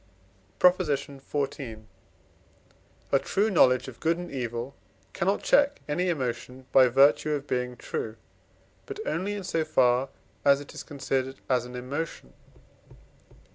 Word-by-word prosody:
PROP. 180 +1 +5
XIV. 140 -6 -3 1.3
A 140 - +5
true 210 +9 0
knowledge 130 -9 +4
of 120 -3 -10
good 165 +1 +1
and 175 0 -7
evil 120 0 -4 0.4
cannot 195 +2 0
check 285 0 +4
any 180 +5 0
emotion 130 -3 -3
by 130 -1 +7
virtue 140 +4 +4
of 145 -1 -3
being 125 -2 -2
true, 110 -2 -4 0.7
but 420 -1 -6
only 205 - -1
in 200 - -5
so 165 -3 0
far 130 -3 +2 0.3
as 140 0 +5
it 145 - -11
is - - -7
considered 135 -2 -2
as 125 -2 +1
an 125 0 -9
emotion. 140 +6 -5
140 Hz, 135 wpm, -27 LUFS, 125-165 Hz, 1.3 s, by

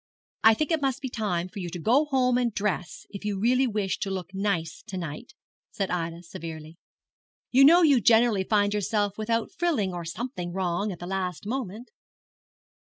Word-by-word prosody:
'I 225 0 +7
think 310 +7 -1
it 320 -2 +1
must 270 -1 0
be 265 - -4
time 205 -7 -2
for 200 +2 -9
you 175 -2 -4
to 175 - -6
go 240 - +3
home 260 -4 +2
and 245 -1 +1
dress, 195 -4 -3
if 200 0 -8
you 205 -2 -2
really 250 +5 +3
wish 205 -4 -1
to 200 - -2
look 190 0 -5
nice 190 -5 -2
to 190 - -5
night,' 175 +7 -7 0.3
said 195 -2 -3
Ida, 170 -1 -3
severely. 160 -1 -8 0.7
'You 270 +2 +7
know 345 +4 +7
you 280 -6 +5
generally 225 -2 +4
find 205 0 +2
yourself 205 0 -1
without 230 +1 -1
frilling, 305 - 0
or 175 -1 -4
something 180 0 -5
wrong, 190 +2 -1
at 180 - -7
the 175 - -8
last 185 -1 -3
moment.' 230 -1 -4
205 Hz, 185 wpm, -26 LUFS, 180-245 Hz, 0.7 s, I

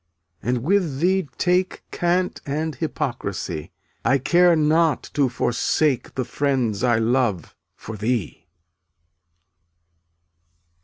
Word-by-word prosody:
and 120 +1 -1
with 170 -5 +1
thee 185 -1 +1
take 180 +1 +1
Cant 180 +1 0
and 155 +3 -2
hypocrisy; 110 - -4 0.3
I 140 - +3
care 175 +6 +4
not 155 -1 +2
to 140 -3 +2
forsake 125 +3 0
The 130 - -1
friends 125 -5 -1
I 120 -2 +3
love, 115 - 0 0.2
for 110 0 -8
thee. 110 -5 -2
140 Hz, 100 wpm, -23 LUFS, 120-165 Hz, 0.3 s, care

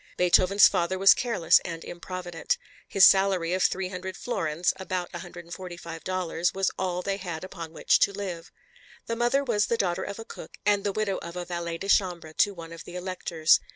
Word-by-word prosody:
Beethoven's 185 +3 +6
father 185 0 0
was 195 +1 +8
careless 225 -10 +3
and 165 -1 -6
improvident. 175 - -4 0.3
His 195 - +6
salary 190 -3 +4
of 185 - 0
300 185 0 -1
florins, 165 -7 -1
about 185 -2 -4
$145, 175 0 -4
was 195 0 +1
all 180 -1 -2
they 195 +1 -1
had 175 -4 -6
upon 165 -3 -8
which 165 - +2
to - - +3
live. 185 -4 -6 0.5
The 230 - -2
mother 240 +4 +2
was 215 -6 +1
the 235 - 0
daughter 180 -5 0
of 200 - -6
a 225 - -8
cook - - -11
and 205 -1 +3
the 205 - 0
widow 200 -1 -1
of 170 +1 -8
a 180 0 -4
valet 170 -1 -4
de 195 - -6
chambre 175 -5 +1
to 205 - +4
one 165 -3 -10
of 165 - -9
the 175 - -10
Electors. 175 -3 +2
185 Hz, 185 wpm, -27 LUFS, 170-195 Hz, 0.5 s, was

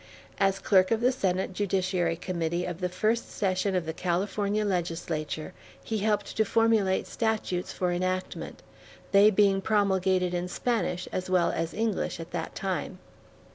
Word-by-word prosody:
As 195 -1 +3
clerk 190 -1 +3
of 225 - +2
the 245 +2 +3
Senate 190 -6 -1
Judiciary 185 -3 0
Committee 170 0 -2
of 175 -1 -5
the 180 - 0
first 215 +6 0
session 190 0 0
of 180 -2 0
the 160 - -3
California 200 +4 -1
Legislature, 165 -3 -2 0.3
he 220 -1 -2
helped 210 0 0
to 220 - +5
formulate 220 -3 +2
statutes 220 -6 -1
for 180 -1 -1
enactment, 185 +1 -3 0.5
they 200 +1 +7
being 195 -1 +3
promulgated 190 -3 +2
in 175 0 -1
Spanish 180 -4 -1
as 185 0 -3
well 180 -2 +3
as 165 0 -3
English 220 -5 -1
at 165 +1 -8
that 165 -2 -4
time. 190 -1 -3
185 Hz, 150 wpm, -28 LUFS, 180-205 Hz, 0.5 s, they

